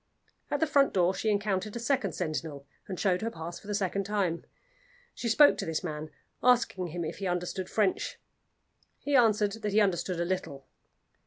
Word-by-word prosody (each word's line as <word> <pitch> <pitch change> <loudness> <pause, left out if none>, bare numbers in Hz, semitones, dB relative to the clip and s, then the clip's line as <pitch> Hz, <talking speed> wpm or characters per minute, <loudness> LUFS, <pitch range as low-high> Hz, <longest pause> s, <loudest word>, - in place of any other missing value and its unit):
At 290 - 0
the 320 - +3
front 280 -2 +3
door 180 0 +3
she 220 - -1
encountered 205 0 -1
a - - -3
second 235 - 0
sentinel, 155 -4 -4 0.2
and 185 -3 -5
showed 185 -3 +1
her 225 - -1
pass 170 -3 -7
for 205 - -16
the 205 - -2
second 195 0 0
time. 195 -4 -1 0.7
She 235 - -3
spoke 290 +6 +6
to - - -2
this 160 +2 -2
man, 155 -2 -5 0.3
asking 235 -7 +3
him 170 +1 -4
if 155 - -6
he 195 - -2
understood 180 +1 -2
French. 205 -4 0 0.8
He 285 0 -1
answered 215 -4 +4
that 210 -2 -2
he 215 - +5
understood 180 -3 +1
a 170 - 0
little. 170 -7 -3
190 Hz, 185 wpm, -29 LUFS, 175-215 Hz, 0.8 s, spoke